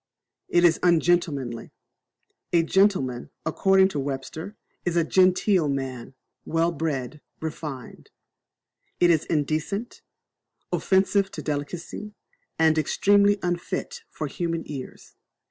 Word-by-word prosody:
It 175 - +3
is 170 -2 +5
ungentlemanly, 165 -8 +1 0.8
A 170 -1 +4
gentleman, 165 -10 +1 0.2
according 190 +3 +4
to 150 - -3
Webster, 135 +8 -5 0.3
is 175 -1 -1
a 170 - +4
genteel 185 -1 +3
man 130 -2 -4 0.3
well 165 +1 +1
bred, 150 -3 -3 0.2
refined. 150 -5 -7 0.9
It 175 -1 +5
is 160 -2 +2
indecent, 155 +8 -2 0.7
offensive 195 +1 +2
to - - -6
delicacy, 165 +8 -5 0.4
and 160 -1 +4
extremely 205 +6 +3
unfit 180 - -3
for - - -5
human 165 -2 -3
ears. 135 -3 -9
165 Hz, 105 wpm, -25 LUFS, 145-185 Hz, 0.9 s, is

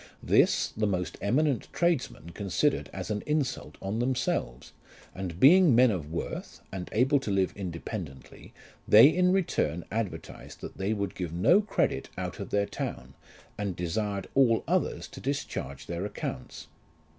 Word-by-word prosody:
This - - +3
the 105 -1 +1
most 90 -3 -2
eminent 135 +3 +1
tradesmen 160 - -1
considered 100 - 0
as 95 +2 -5
an 105 -1 -1
insult 135 - -2
on 100 +4 -2
themselves, 120 - -2 0.4
and 90 -3 -6
being 165 - +7
men 125 0 +6
of 80 -6 -4
worth, 85 - -5
and 95 -2 -6
able 135 +5 +3
to 130 - -5
live 95 -2 +1
independently, 85 - -7 0.4
they 110 +6 +9
in 180 +3 +3
return 90 - 0
advertised 110 -3 -5
that - - -8
they 95 +2 -1
would 100 -3 -2
give 90 -3 -5
no 135 - +4
credit 210 -1 -1
out - - -4
of - - -5
their 100 0 +1
town, 65 -8 -6 0.5
and 100 -3 -2
desired 100 +3 -2
all 120 -5 +4
others - - 0
to - - -10
discharge 125 - -4
their 85 +1 -4
accounts. 65 -10 -6
105 Hz, 150 wpm, -28 LUFS, 90-130 Hz, 0.5 s, they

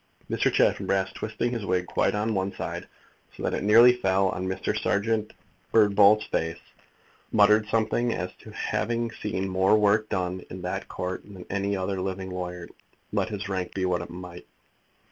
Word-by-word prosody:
Mr. - - +2
Chaffanbrass, 95 -1 +1
twisting 110 +2 -3
his 115 -3 -3
wig 90 -2 0
quite - - 0
on 110 +2 0
one 95 0 -1
side, - - -5 0.5
so - - -7
that - - 0
it - - -1
nearly 115 +4 +7
fell 95 -3 +2
on 95 0 -3
Mr. 95 - -2
Serjeant 110 +1 0 0.4
Birdbolt's 105 -1 +5
face, 80 0 -2 0.7
muttered 105 0 +5
something 115 +2 +1
as 90 -4 -3
to - - -13
having 115 +1 -2
seen 95 -3 -3
more 95 +3 +3
work 105 +1 +3
done 90 0 -2
in 90 0 -8
that 90 - -3
Court 90 0 -4
than 95 -3 -11
any 100 0 0
other 95 0 -2
living 95 0 -4
lawyer, 90 -1 -5 0.5
let - - 0
his - - -4
rank 95 -2 -3
be 95 -1 0
what 90 -1 0
it 85 - -8
might. 90 0 -9
95 Hz, 170 wpm, -26 LUFS, 95-105 Hz, 0.7 s, nearly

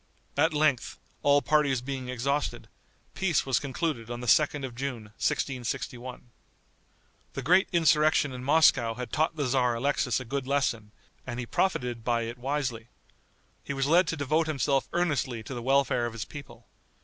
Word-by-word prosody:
At 160 +4 +3
length, 150 -5 +1 0.2
all 145 0 +4
parties 145 -4 +2
being 130 0 -5
exhausted, 140 +4 -2 0.5
peace 185 -5 +1
was 130 -3 +2
concluded 140 -4 -3
on 120 0 -4
the 125 - -6
2d 145 +2 +3
of 125 - -7
June, 125 -2 -4 0.2
1661. 125 -1 -3 1.0
The 135 - -5
great 180 +7 +4
insurrection 155 -4 +3
in 125 0 -7
Moscow 135 -6 +4
had 125 -1 -6
taught 160 +1 +1
the 145 -3 -1
tzar 125 -2 +2
Alexis 125 -1 0
a 130 - -7
good 135 +2 -3
lesson, 120 -6 0 0.4
and 120 -1 -4
he 125 - -3
profited 125 -7 -1
by 115 0 +1
it 120 +2 -6
wisely. 130 -4 -2 0.8
He 140 - -4
was 135 -1 0
led 170 +5 +4
to 165 - -2
devote 155 +3 +1
himself 135 -4 0
earnestly 140 -9 -1
to 135 - -7
the 120 - -5
welfare 130 -2 +2
of 115 - -7
his 115 -2 -5
people. 145 -1 -11
135 Hz, 165 wpm, -28 LUFS, 120-150 Hz, 1.0 s, all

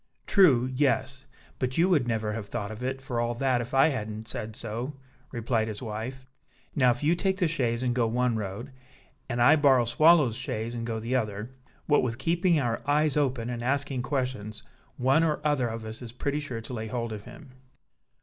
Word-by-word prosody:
"True! 140 - +5
yes; 130 -1 0 0.3
but 130 0 -2
you 170 +3 +4
would 150 -10 +2
never 110 -2 -1
have 105 -2 -5
thought 100 0 -4
of 110 +2 -8
it 130 +1 -3
for 125 -3 -3
all 120 0 -1
that, 130 0 +1
if 120 - -7
I 135 +4 +6
hadn't 110 -5 -4
said 110 -1 -5
so," 115 +6 -5 0.4
replied 115 -2 0
his 105 -2 -5
wife. 120 +3 -6 0.5
"Now, 130 -5 +4
if 120 +2 0
you 155 +3 +4
take 190 +2 0
the 180 -3 +2
chaise 125 -6 -1
and 125 -1 +1
go 120 -2 +1
one 120 +1 +1
road, 110 +5 -5 0.6
and 120 0 -2
I 140 +6 +7
borrow 135 -5 +4
Swallow's 150 0 +5
chaise 115 +1 -3
and 115 -1 -4
go 115 -1 -2
the 115 +4 -2
other, 110 -1 -2 0.3
what 145 - +4
with 120 -2 -2
keeping 170 +4 +2
our 120 -4 -1
eyes 150 0 +3
open, 130 -5 0
and 120 -1 -4
asking 135 +1 -1
questions, 125 -6 -3 0.3
one 135 +5 +3
or 155 -2 +1
other 145 -5 +2
of 115 0 -5
us 110 +2 -7
is 120 -2 -7
pretty 140 +4 -2
sure 130 -6 -5
to 115 +3 -8
lay 110 -2 -4
hold 115 0 -3
of 105 -1 -8
him." 125 +3 -12
125 Hz, 205 wpm, -27 LUFS, 115-140 Hz, 0.6 s, I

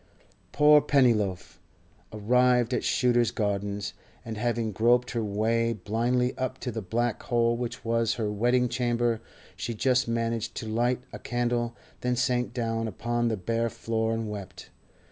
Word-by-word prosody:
Poor 150 0 +6
Pennyloaf! 110 -11 +1 0.5
Arrived 125 +3 +2
at 125 - 0
Shooter's 120 -2 +2
Gardens, 100 -1 -2 0.3
and 115 -1 -5
having 115 0 -1
groped 120 +4 +2
her 115 -2 -1
way 115 +3 +1
blindly 120 +5 0
up 130 0 -2
to 125 - -3
the 110 0 -4
black 115 +4 -1
hole 120 -1 +1
which 120 -1 -5
was 115 -1 +1
her 110 -3 -2
wedding 120 +4 +2
chamber, 120 -2 0 0.3
she 115 - -4
just 125 +2 +2
managed 115 -1 -2
to 110 - -5
light 120 +3 0
a - - -6
candle, 120 -1 -1 0.2
then 125 0 0
sank 125 0 0
down 115 -2 -2
upon 120 +3 -1
the 110 -2 0
bare 115 +5 -1
floor 115 0 -2
and 115 -1 -3
wept. 105 -3 -8
115 Hz, 150 wpm, -27 LUFS, 110-120 Hz, 0.5 s, Poor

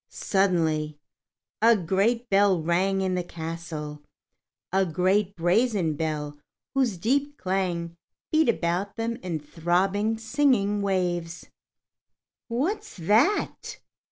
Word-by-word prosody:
Suddenly, 160 -6 0 0.6
a 230 0 +6
great 200 +7 +1
bell 195 -3 +4
rang 185 +4 +1
in 190 -1 0
the 180 -1 -1
castle, 160 -3 -6 0.7
a 190 0 +4
great 190 +4 +1
brazen 180 0 +2
bell 150 -1 -3 0.3
whose 255 -8 +1
deep 280 +9 0
clang 180 -3 -2 0.4
beat 315 -4 +3
about 185 0 -1
them 230 0 -2
in 175 -4 -4
throbbing, 185 +8 0
singing 220 -4 +1
waves. 180 -3 -1 1.0
"What's 345 - -2
that?" 220 - +1
190 Hz, 100 wpm, -26 LUFS, 170-225 Hz, 1.0 s, a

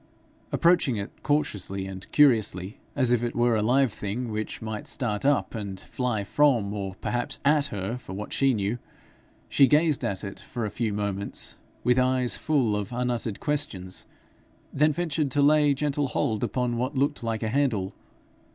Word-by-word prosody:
Approaching 170 -8 +3
it 100 0 -4
cautiously 100 - -1
and 95 0 -8
curiously, 110 -9 +3 0.2
as 130 -4 +3
if 120 -1 +2
it 120 - -2
were 120 -1 +3
a 110 - +1
live 125 +1 +3
thing, 110 +4 -4
which 110 0 -3
might 110 -2 -5
start 110 -4 -1
up 145 0 +2
and 100 -4 -5
fly 120 -3 -2
from, 115 -3 +2
or 95 -2 -4
perhaps 120 +4 -1
at 145 0 +4
her, 100 +4 -3
for 110 -7 -9
what 105 +2 -6
she 135 -2 +3
knew, 105 +3 -1 0.7
she 135 - +5
gazed 150 0 +3
at 95 0 -2
it 100 -1 -6
for 120 -3 -5
a 105 - -4
few 115 -2 -1
moments 100 -1 -1 0.2
with 125 +1 +3
eyes 130 -1 +2
full 130 -9 +1
of 105 +1 -3
unuttered 120 -3 -2
questions, 95 -11 -2 0.7
then 150 +2 +3
ventured 155 -2 -1
to 145 +2 +1
lay 150 0 +5
gentle 145 0 0
hold 120 -5 -1
upon 125 -2 -1
what 130 +4 -2
looked 140 +2 +1
like 115 -1 -2
a 110 - 0
handle. 115 -7 0
120 Hz, 170 wpm, -26 LUFS, 105-140 Hz, 0.7 s, she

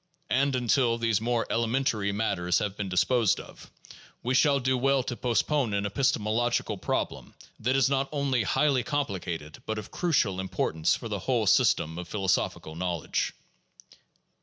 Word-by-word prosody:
And 135 +1 +2
until 120 -1 +2
these 115 -3 +1
more 120 0 0
elementary 115 -3 0
matters 100 -4 0
have 100 -2 -2
been 100 -2 -4
disposed 110 +3 +2
of - - -12 0.5
we 125 - 0
shall 140 +1 +4
do 130 0 +1
well 135 +1 +2
to 120 - -4
postpone 125 -1 0
an 100 0 -1
epistemological 110 -1 0
problem - - -3 0.2
that 125 +4 +1
is 135 -2 +4
not 135 0 0
only 140 -4 0
highly 135 +5 +2
complicated 95 - -4
but 110 - -2
of 105 -1 -7
crucial 125 - +1
importance 80 -4 0
for - - -7
the - - -3
whole - - 0
system 80 +2 +3
of 90 - -7
philosophical 95 -5 -1
knowledge. 85 -2 -2
115 Hz, 150 wpm, -27 LUFS, 100-130 Hz, 0.5 s, shall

